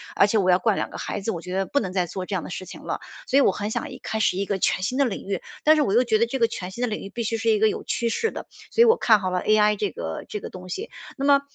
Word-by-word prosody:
而 200 - +5
且 220 - +1
我 185 -2 +3
要 180 - +4
管 210 +1 +2
2 - - -3
个 - - -7
孩 205 - -4
子， 225 - -1
我 170 - -5
觉 180 +1 -5
得 195 - +1
不 285 - +1
能 185 -4 -3
再 185 -2 +1
做 185 +2 -6
这 200 - -2
样 175 - -2
的 - - -8
事 185 - -5
情 - - -10
了。 - - -3 0.3
所 260 - -2
以 - - +6
我 195 - +5
很 205 +3 -4
想 - - -3
一 - - -8
开 220 - -3
始 190 -3 +2
一 200 - 0
个 195 -1 -2
全 185 - +1
新 250 +6 -1
的 280 - +4
领 225 - -3
域， 195 -3 -2 0.2
但 310 +1 +6
是 305 - +3
我 195 - +1
又 245 - +5
觉 220 -3 +2
得 230 - +3
这 265 +2 -2
个 230 -2 +3
全 185 -5 -6
新 235 +6 -5
的 - - +2
领 215 - -3
域 195 - -7
必 235 +2 -4
须 225 +1 -1
是 225 0 0
一 215 - +4
个 220 +1 +4
有 - - -2
趋 235 -1 -1
势 450 - 0
的， - - -7 0.2
所 465 - +5
以 - - +6
我 455 +1 +6
看 220 - +4
好 185 -1 -2
了 180 - 0
AI 210 0 +4
这 205 -1 -1
个 80 - -5
这 210 - -4
个 - - -7
东 185 0 -10
西。 420 - -5 0.3
那 275 - -2
么， 280 -1 +5
210 Hz, 385 characters per minute, -24 LUFS, 190-235 Hz, 0.3 s, 以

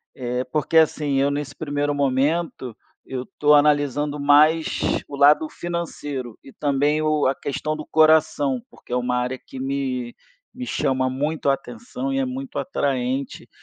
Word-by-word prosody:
eh, 125 0 -2
porque 155 +1 +1
assim 150 -3 +3
eu 140 +1 +2
nesse 145 -1 -4
primeiro 145 -1 -2
momento, 140 -2 0 0.3
eu 130 -1 -5
tô 150 0 +6
analisando 145 0 +2
mais 150 +3 +4 0.3
o 145 - -7
lado 150 +2 +5
financeiro 145 -8 -5
e 135 - -14
também 145 +1 +1
o 155 -1 +1
a 130 - +3
questão 155 +3 -3
do 155 - -7
coração, 155 -4 +3
porque - - -11
é - - +2
uma 125 0 0
área 125 +1 -2
que 130 - -10
me 130 -3 -3 0.4
me 250 0 -7
chama 130 -1 0
muito 145 +3 -1
a - - +5
atenção 245 - -5
e 270 - 0
é 270 - +1
muito 260 +1 -5
atraente 135 - -2
145 Hz, 160 wpm, -22 LUFS, 130-155 Hz, 0.4 s, tô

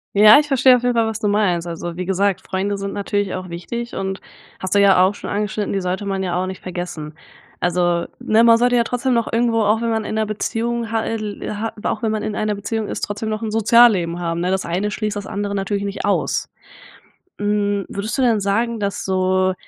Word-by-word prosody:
Ja 210 +4 +9
ich 295 - -1
verstehe 260 -1 +6
auf 245 - -2
jeden 245 0 +2
Fall 230 -1 +2
was 220 -1 -3
du 210 -2 0
meinst. 190 -5 +1
Also 170 0 -5
wie 180 +1 -4
gesagt: 195 +1 +1
„Freunde 200 +2 -2
sind 200 0 -4
natürlich 205 -1 -2
auch 185 0 -5
wichtig 235 +8 -5
und 190 0 -3 0.4
hast 185 +1 -2
du - - +5
ja 195 -2 +6
auch 190 +2 +3
schon - - -7
angeschnitten, 210 0 -2
die 195 - 0
sollte 185 +2 -3
man 195 -1 -2
ja 180 -2 -2
auch 185 - -2
nicht 190 - -7
vergessen“. 175 -4 -6 0.5
Also, 175 -1 +1
ne, 220 +1 +3
man 230 -1 +7
sollte 245 +1 +2
ja 235 - +4
trotzdem 250 +2 -1
noch 230 -1 0
irgendwo, 230 -1 +2
auch 215 +2 +2
wenn 230 - 0
man 220 -1 0
in - - -4
'ner 220 0 +1
Beziehung 225 +2 -2
hat 225 -1 0
el 215 -1 -4
hat 225 +2 -4
aber 210 - -2
auch 215 - -4
wenn 220 - +1
man 215 -1 -2
in 210 - -3
einer 215 -1 -1
Beziehung 215 +2 -3
ist, - - -4
trotzdem 205 +2 -3
noch 215 0 -3
'n 220 -1 -3
Sozialleben 215 -6 +4
haben, 170 -1 -2
ne? 180 +1 0
Das 190 0 -1
eine 185 +5 -1
schließt 210 0 -3
das 205 -1 -5
andere 200 0 -3
natürlich 200 +1 -2
nicht 200 - -4
aus. - - 0 0.9
Hm, 205 -1 0
würdest 205 +6 -4
du 265 - +2
denn 230 -4 +3
sagen, 225 +3 0
dass 200 -1 -2
so 185 0 +1
205 Hz, 235 wpm, -20 LUFS, 190-225 Hz, 0.9 s, Ja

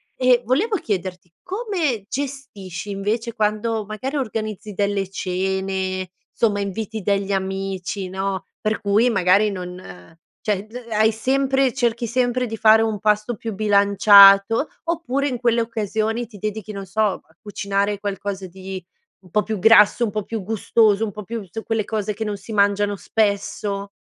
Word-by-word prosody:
e 255 -1 +4
volevo 375 - +1
chiederti 180 - -4
come 365 - -2
gestisci, 260 -9 -6
invece, 215 +4 -2
quando 215 +1 0
magari 215 +7 -5
organizzi 215 -5 -4
delle 200 -1 -1
cene 190 0 -2 0.3
insomma 205 -3 +2
inviti 215 +2 -4
degli 200 0 0
amici, 195 0 -3
no, 190 0 -3 0.2
per 215 +1 -1
cui 210 +4 +3
magari 195 0 +3
non 180 - -9 0.2
cioè, 205 -2 -1
b 215 - -25
uhm, 240 -1 -9
hai 220 +1 +3
sempre 265 +3 +1
cerchi 235 -2 0
sempre 250 +1 0
di 225 -2 -5
fare 220 0 +5
un 220 -2 -1
pasto 210 +3 +1
più 225 +1 -5
bilanciato, 200 +3 +6 0.2
oppure 285 -5 -1
in 255 -3 -2
quelle 235 -1 +2
occasioni 225 +1 -2
ti 210 -2 -13
dedichi, 215 +1 -4
non 200 -1 -6
so, 205 +4 -2
a 190 -6 -2
cucinare 200 -1 -2
qualcosa 200 -1 -4
di 190 +1 -8 0.4
un 180 -3 -20
po' 210 +2 +2
più 220 -2 -3
grasso, 225 +3 +6
un 215 - -3
po' 215 0 -2
più 225 +1 -5
gustoso, 215 +1 +2
un 215 - -2
po' 210 +2 -8
più 230 +1 -5
s 195 +4 -7
quelle 225 -1 0
cose 210 0 -2
che 220 - -4
non 210 -2 -3
si 200 +3 -9
mangiano 205 0 +2
spesso. 200 -1 -1
210 Hz, 160 wpm, -21 LUFS, 195-225 Hz, 0.4 s, bilanciato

